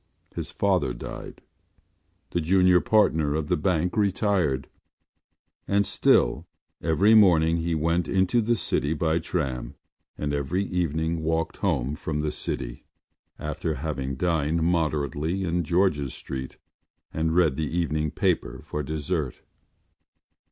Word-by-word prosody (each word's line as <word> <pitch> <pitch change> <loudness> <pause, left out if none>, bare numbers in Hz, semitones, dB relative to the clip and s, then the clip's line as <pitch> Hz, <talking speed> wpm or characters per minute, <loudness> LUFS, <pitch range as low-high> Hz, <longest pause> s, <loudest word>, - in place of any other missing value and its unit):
His - - -4
father - - +1
died; - - -8 0.9
the 85 - 0
junior 90 +2 +4
partner 80 -9 +2
of 75 -1 -2
the - - +3
bank 90 +2 0
retired. 95 - +1 1.0
And 100 0 +2
still 65 -2 +2 0.3
every 95 +7 +3
morning 85 -6 +5
he 85 0 -1
went 85 +2 0
into 95 +5 +2
the 120 +2 +1
city 75 -8 0
by 80 +1 +1
tram 70 -8 -3 0.4
and 75 -1 -2
every 70 +8 -1
evening 80 -2 -1
walked 80 +1 -1
home 65 +4 0
from 75 -2 -3
the 75 0 -1
city - - -5 0.5
after 75 +1 -3
having 70 -2 -3
dined 80 +1 0
moderately 80 +1 0
in 85 0 0
George’s 85 -5 +1
Street 65 -1 -6 0.6
and 80 +1 0
read 80 -6 +3
the 80 0 -2
evening 75 -2 0
paper - - -1
for 75 - -4
dessert. 75 0 -3
80 Hz, 125 wpm, -26 LUFS, 75-90 Hz, 1.0 s, morning